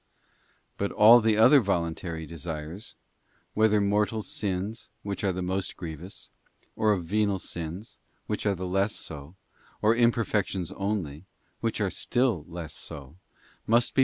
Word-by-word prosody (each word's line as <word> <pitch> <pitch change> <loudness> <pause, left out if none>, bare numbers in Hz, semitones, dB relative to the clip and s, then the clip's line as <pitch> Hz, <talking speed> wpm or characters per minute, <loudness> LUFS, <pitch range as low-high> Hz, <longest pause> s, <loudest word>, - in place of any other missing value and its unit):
But 100 - -1
all 110 +3 +8
the 110 -1 +3
other 130 +6 +8
voluntary 85 -4 -2
desires, 80 +3 -7 0.6
whether 110 -1 +4
mortal 105 +2 +1
sins, 100 +2 -3
which 100 0 -4
are 100 - +2
the 90 0 -3
most 95 +1 -2
grievous, 85 +3 -7 0.4
or 110 -1 +3
of 90 -5 0
venial 100 +2 +1
sins, 90 +4 -7 0.3
which - - -2
are 100 - +2
less 95 +3 0
so, 75 +3 -7 0.4
or 110 +2 +4
imperfections 105 -6 +1
only, 95 -6 -3 0.3
which - - -1
are - - 0
still 120 - 0
less 85 -3 -7
so, 70 +3 -8 0.5
must 120 +2 +3
be. - - 0
95 Hz, 135 wpm, -27 LUFS, 85-105 Hz, 0.6 s, all